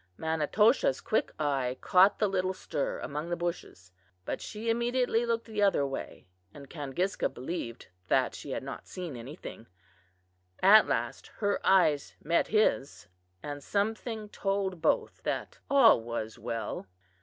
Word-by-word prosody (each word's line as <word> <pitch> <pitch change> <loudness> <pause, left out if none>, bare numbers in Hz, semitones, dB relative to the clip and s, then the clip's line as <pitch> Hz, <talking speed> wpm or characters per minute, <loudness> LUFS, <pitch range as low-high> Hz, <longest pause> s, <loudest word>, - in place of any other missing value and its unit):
Manitoshaw's 160 - +2
quick 220 - 0
eye 135 -4 0
caught 185 +2 +5
the 210 - +2
little 190 -1 -1
stir 145 -6 -3
among 150 +4 -4
the 175 - 0
bushes, 170 - -5 0.3
but - - -3
she 220 +1 -6
immediately 235 0 +1
looked 230 0 0
the 215 -2 -3
other 195 -8 +3
way 135 -7 -6 0.3
and 140 -2 -12
Kangiska 160 +5 -1
believed 125 -3 -6 0.2
that - - +2
she - - -9
had - - -3
not - - -7
seen 175 -7 -6
anything, 120 -1 -9 1.0
At 210 +3 +8
last - - -2
her 205 -1 0
eyes 155 -7 +3
met 170 +2 +1
his, 140 - +1 0.3
and 145 -1 -6
something 215 +1 -2
told 195 -4 -2
both 160 - +1
that - - -3
all 260 - +6
was 115 -1 -5
well. 115 -3 -4
175 Hz, 140 wpm, -30 LUFS, 140-210 Hz, 1.0 s, At